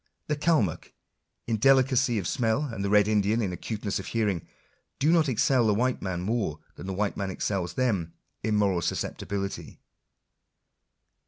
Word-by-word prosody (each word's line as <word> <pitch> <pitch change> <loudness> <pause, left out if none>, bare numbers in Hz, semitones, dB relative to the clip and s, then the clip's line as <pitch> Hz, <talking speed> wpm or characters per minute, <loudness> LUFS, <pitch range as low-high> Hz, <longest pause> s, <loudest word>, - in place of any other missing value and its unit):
The 150 - -1
Calmuck 145 - 0 0.5
in 115 -1 0
delicacy 130 0 +4
of 95 -5 -2
smell, 120 - +1
and 115 -8 -4
the 100 - 0
red 105 0 +5
Indian 105 +1 +2
in 100 -5 -1
acuteness 105 +2 -3
of 95 - -7
hearing, 105 -7 -1 0.5
do 150 +4 +3
not 160 -4 +4
excel 125 0 +3
the 105 - +3
white 125 +3 0
man 90 -2 -3
more 100 -6 -1 0.2
than 95 - -9
the 95 - -2
white 100 +1 -1
man 100 -2 -2
excels 95 -2 -2
them 100 -11 0 0.3
in 110 0 0
moral 100 -4 +2
susceptibility. 100 +4 -4
105 Hz, 160 wpm, -27 LUFS, 95-125 Hz, 0.5 s, red